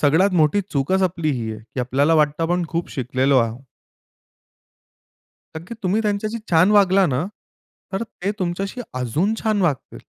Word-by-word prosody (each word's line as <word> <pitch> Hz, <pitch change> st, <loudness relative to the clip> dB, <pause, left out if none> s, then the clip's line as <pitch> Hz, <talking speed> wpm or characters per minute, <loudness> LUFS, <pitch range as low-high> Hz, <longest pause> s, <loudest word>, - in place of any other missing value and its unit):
सगळ्यात 160 Hz, +7 st, +4 dB
मोठी 155 Hz, +7 st, +3 dB
चूकच 170 Hz, +7 st, +1 dB
आपली 170 Hz, -4 st, 0 dB
ही 115 Hz, -5 st, -3 dB
आहे, 110 Hz, -, -9 dB
की 130 Hz, -, -1 dB
आपल्याला 140 Hz, +6 st, +2 dB
वाटतं 150 Hz, +1 st, +2 dB
आपण 175 Hz, +1 st, 0 dB
खूप 170 Hz, +1 st, -3 dB
शिकलेलो 130 Hz, +1 st, +1 dB
आहो 115 Hz, +1 st, -1 dB, 2.0 s
नक्की. 175 Hz, +8 st, -7 dB
तुम्ही 190 Hz, +4 st, +1 dB
त्यांच्याशी 215 Hz, +2 st, -1 dB
छान 175 Hz, +4 st, +5 dB
वागला 195 Hz, -2 st, +5 dB
ना, 135 Hz, +4 st, 0 dB, 0.7 s
तर 195 Hz, -, -1 dB
ते 200 Hz, -3 st, -4 dB
तुमच्याशी 195 Hz, +6 st, -3 dB
अजून 145 Hz, -, 0 dB
छान 215 Hz, -3 st, +1 dB
वागतील. 145 Hz, -7 st, -2 dB
170 Hz, 150 wpm, -21 LUFS, 140-195 Hz, 2.0 s, छान